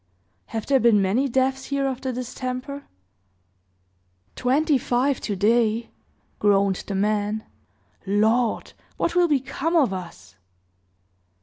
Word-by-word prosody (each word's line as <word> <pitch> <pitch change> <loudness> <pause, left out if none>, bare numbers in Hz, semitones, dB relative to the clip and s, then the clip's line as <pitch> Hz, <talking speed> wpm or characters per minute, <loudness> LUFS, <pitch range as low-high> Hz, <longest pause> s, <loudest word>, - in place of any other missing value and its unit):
"Have 225 -2 -4
there 275 -1 +3
been 230 -4 +5
many 215 +9 +1
deaths 265 +1 0
here 280 -1 -1
of 265 -2 -2
the 260 - -2
distemper?" 255 +3 -5 1.5
"Twenty 280 +3 +2
five 250 +3 0
to 205 - -2
day!" 225 +3 +2 0.5
groaned 200 -2 +3
the 200 - -3
man. 210 +2 0 0.6
"Lord! 220 +4 +1 0.2
what 335 - 0
will 355 0 +4
become 290 +3 -1
of 270 - +3
us?" 100 - -9
245 Hz, 115 wpm, -24 LUFS, 210-270 Hz, 1.5 s, been